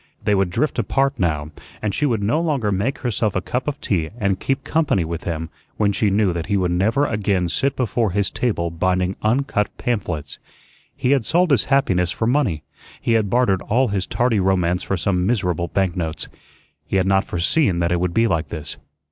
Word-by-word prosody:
They 105 - +2
would 95 -2 +2
drift 140 - -1
apart 135 +5 +1
now, 75 -4 -1 0.3
and 105 -2 -2
she 150 - +1
would 115 -6 0
no 145 +11 +1
longer 140 -11 0
make 105 +8 -1
herself 115 -5 -1
a - - +2
cup 125 +9 -3
of 145 -1 -2
tea 80 -6 -1
and 100 -4 0
"keep 135 0 -1
company" 150 - +1
with 85 0 -5
him 80 -1 -3 0.3
when 105 -1 +2
she 105 +1 +1
knew 100 -2 +2
that 85 -1 -4
he 100 -1 +1
would 90 -2 0
never 110 +11 +2
again 100 -7 0
sit 140 +9 0
before 115 -2 0
his 100 +2 0
table 85 -9 -1
binding 90 +2 0
uncut 110 -2 +1
pamphlets. 90 - -3 0.6
He 125 - 0
had 140 -4 +3
sold 175 - +2
his 130 -7 +3
happiness 95 -11 +2
for 110 - -2
money; 115 - +1 0.4
he - - -1
had 110 -3 +2
bartered 110 -6 +2
all 125 +3 +1
his 100 -2 -1
tardy 120 -3 +1
romance 90 -1 +1
for 95 - -2
some 90 +1 0
miserable 90 -7 0
banknotes. 85 -4 -2 0.6
He 95 - -3
had 95 -1 +3
not 95 0 +3
foreseen 90 - +1
that 85 0 0
it 90 - +1
would 90 -1 -1
be 115 - +4
like 80 -7 0
this. 75 -2 -7
100 Hz, 200 wpm, -21 LUFS, 90-120 Hz, 0.6 s, be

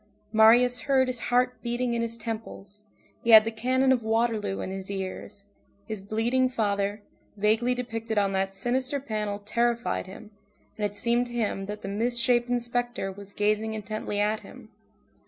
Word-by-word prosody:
Marius 240 +3 +6
heard 260 -1 +4
his 250 -2 -2
heart 250 +1 +1
beating 240 0 -1
in 235 - 0
his 230 0 -2
temples, 215 -2 -7 0.4
he 235 - -2
had 220 -1 +9
the 225 - -1
cannon 255 +4 +1
of 255 -2 +3
Waterloo 220 -3 0
in 185 - -4
his 190 0 -6
ears, 195 0 -6 0.4
his 215 -3 -4
bleeding 235 +6 +1
father, 205 -3 -1 0.3
vaguely 220 +4 +2
depicted 225 -3 -4
on 200 -1 +2
that 195 0 0
sinister 255 +7 -1
panel 215 -5 -3
terrified 235 +1 -1
him, 210 +3 -11 0.4
and 210 - -2
it 205 0 -4
seemed 240 +2 +1
to 240 - -10
him 205 -4 -2
that 210 0 -6
the - - -4
misshapen 240 +3 +1
spectre 240 -3 -2
was 200 +1 -11
gazing 215 +2 0
intently 215 -1 -4
at 210 +1 +1
him. - - -14
225 Hz, 165 wpm, -27 LUFS, 205-240 Hz, 0.4 s, had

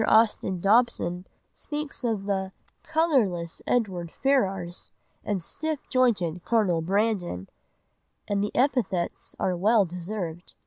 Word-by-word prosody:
Austin 215 -4 +3
Dobson 195 -4 +2 0.3
speaks 295 -3 -5
of 225 -5 0
the 190 -1 -1 0.3
"colourless 230 - +1
Edward 185 -8 0
Ferrars 195 -10 0 0.3
and 195 -4 -2
stiff 315 - -4
jointed 190 -10 +2
Colonel 200 -8 +2
Brandon," 185 - 0 0.8
and 200 -1 +1
the 210 - 0
epithets 240 -9 0
are 185 - +1
well 205 +3 +4
deserved. 175 -1 -6
200 Hz, 105 wpm, -27 LUFS, 175-235 Hz, 0.8 s, well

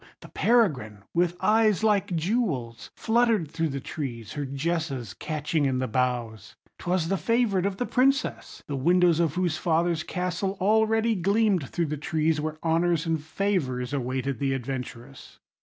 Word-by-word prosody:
the - - -12
peregrine, 135 - +1
with 175 0 +1
eyes 215 -2 +3
like 200 -4 +2
jewels, 160 - -2
fluttered 225 -8 +1
through 165 0 -1
the 140 0 -3
trees, 120 -5 -6
her 145 -1 -3
jesses 140 - -2
catching 155 +3 -2
in 130 -2 +1
the 130 0 -1
boughs. 120 -3 -2 0.2
'Twas 180 -2 0
the 195 +2 0
favourite 215 -4 +1
of 195 -1 -4
the 245 - -1
Princess, 270 +3 0
the 145 - -4
windows 175 +4 +3
of 165 -3 +1
whose 175 -3 0
father's 170 -1 +1
castle 180 +3 -3
already 220 +3 +3
gleamed 200 - +1
through 170 - -1
the 150 0 -3
trees, 155 +1 0
where 155 0 -4
honours 165 0 +1
and 165 -2 0
favours 155 -7 -2
awaited 130 -1 -2
the 135 -1 0
adventurous. 130 0 -7
165 Hz, 155 wpm, -26 LUFS, 135-195 Hz, 0.2 s, eyes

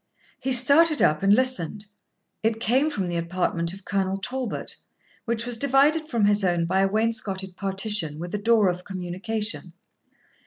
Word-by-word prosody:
He 265 - -3
started 285 +5 +6
up 150 0 +2
and 195 +1 +3
listened; 215 -5 +1 0.6
it 225 0 -1
came 260 +7 +1
from 195 -11 -3
the 175 -1 -3
apartment 170 0 -2
of 195 +1 -11
Colonel 195 -1 -1
Talbot, 250 +3 -4 0.5
which 230 0 -2
was 240 -1 0
divided 280 +5 +2
from 230 -6 +1
his 205 0 +2
own 175 -2 +1
by 185 +3 0
a 195 - +3
wainscotted 205 -4 -2
partition, 195 -5 -1
with 175 +3 -7
a 210 - -2
door 220 -1 +3
of 180 0 -2
communication. 190 +4 -4
205 Hz, 160 wpm, -24 LUFS, 185-235 Hz, 0.6 s, started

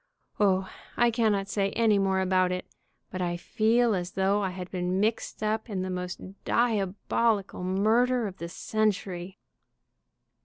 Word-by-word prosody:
O, 190 -2 +3 0.3
I 240 0 +4
cannot 215 -4 +1
say 195 0 0
any 220 -3 +3
more 190 -1 +2
about 185 -1 +2
it, 180 0 -3 0.5
but 185 - -4
I 175 -1 -1
feel 225 +5 +2
as 180 -2 -3
though 195 +2 +2
I 195 - 0
had 180 0 -7
been 180 0 -1
mixed 220 +1 -1
up 220 +2 -1
in 190 -3 -2
the 185 - -3
most 180 +2 -6
diabolical 210 -2 0
murder 225 +6 +2
of 195 -2 -6
the 170 -1 -6
cen 215 +4 +1
tury." 185 -2 -5
195 Hz, 155 wpm, -28 LUFS, 185-220 Hz, 0.5 s, I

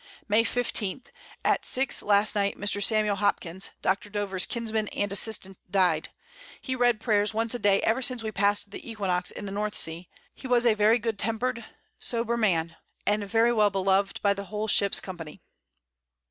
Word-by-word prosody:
May 215 +2 +3
15. 240 -1 -2 0.4
At - - +2
6 265 +1 +1
last 205 +1 +3
Night 200 -1 0
Mr. 205 0 +1
Samuel 210 -1 +2
Hopkins, 190 -2 -1
Dr. 195 +2 0
Dover's 200 -2 0
Kinsman 220 -3 -2
and 205 -1 -3
Assistant, 195 -2 0
died; 180 -5 +1 0.5
he 260 - -4
read 245 -3 +2
Prayers 210 -1 +1
once 225 +1 +1
a 245 - -3
Day 200 -2 +3
ever 230 +4 +1
since 250 -2 0
we 220 - -3
pass'd 200 +1 0
the 225 - -9
Equinox 185 -5 -2
in 205 - -8
the 195 - -5
North 210 +1 -3
Sea: 165 +2 -2 0.2
He 260 - -9
was 245 -1 +2
a 235 - +5
very 215 +2 +4
good 225 -3 -3
temper'd 235 +1 -2 0.3
sober 235 0 -1
Man, 170 -7 0 0.3
and 210 0 +1
very 230 +2 +3
well 210 -2 +4
beloved 195 0 +1
by 200 -1 +4
the 200 0 -7
whole 210 +2 -4
Ship's 200 -2 +4
Company. 165 -5 -9
210 Hz, 175 wpm, -27 LUFS, 195-225 Hz, 0.5 s, a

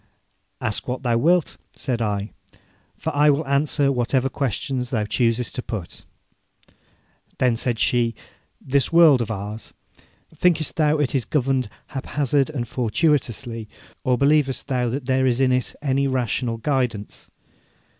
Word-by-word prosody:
'Ask 110 -2 -2
what 130 +2 -3
thou 120 -2 +1
wilt,' 165 +7 +2 0.2
said 120 -4 -2
I, 105 -1 -2 0.7
'for - - -4
I 150 +1 +5
will 145 +2 +2
answer 140 0 +2
whatever 130 +1 +1
questions 130 -1 -2
thou 110 -4 0
choosest 115 +2 0
to 125 - -3
put.' 105 -8 -7 1.3
Then 125 -2 +2
said 120 0 -1
she: 115 0 +1 0.4
'This 135 0 0
world 165 -6 +6
of 115 - -3
ours 105 +1 -6 0.6
thinkest 160 -1 +1
thou 155 -1 +3
it 145 -3 0
is 135 -4 +1
governed 130 -4 0 0.2
haphazard 140 +1 0
and 125 -6 -4
fortuitously, 120 -3 -1 0.3
or 125 -1 +2
believest 140 0 +2
thou 125 -2 0
that 130 +2 -4
there 130 0 +2
is 125 -1 +1
in 130 -1 +3
it 125 -1 -1
any 140 0 +1
rational 125 -2 -1
guidance?' 125 -5 -2
130 Hz, 140 wpm, -23 LUFS, 115-140 Hz, 1.3 s, world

